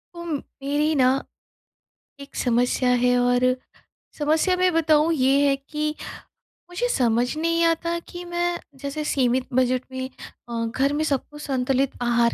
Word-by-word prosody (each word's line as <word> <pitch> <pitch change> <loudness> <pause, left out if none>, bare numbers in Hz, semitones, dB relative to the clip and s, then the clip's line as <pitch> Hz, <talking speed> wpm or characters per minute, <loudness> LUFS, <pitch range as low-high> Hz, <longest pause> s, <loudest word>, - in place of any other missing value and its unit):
उम, 340 -2 -4 0.3
मेरी 295 +3 +1
ना 255 -3 +4 1.1
एक 280 0 -12
समस्या 245 +1 +1
है 250 0 +3
और 245 0 +2 0.8
समस्या 315 +5 +2
मैं 365 0 +3
बताऊँ 315 0 +3
ये 275 0 +3
है 275 - +3
कि, 300 +2 -3 0.7
मुझे 355 +8 -1
समझ 245 - +1
नहीं 335 +1 +1
आता 335 +1 +1
कि 350 0 -7
मैं 345 0 -1 0.2
जैसे 280 +3 -4
सीमित 255 -2 +1
बजट 255 0 +2
में 260 0 -4 0.4
अ, 230 -1 -2
घर 265 +5 0
में 300 +1 0
सबको 295 0 -2
संतुलित 270 -1 0
आहार 235 -1 +2
280 Hz, 140 wpm, -24 LUFS, 250-315 Hz, 1.1 s, ना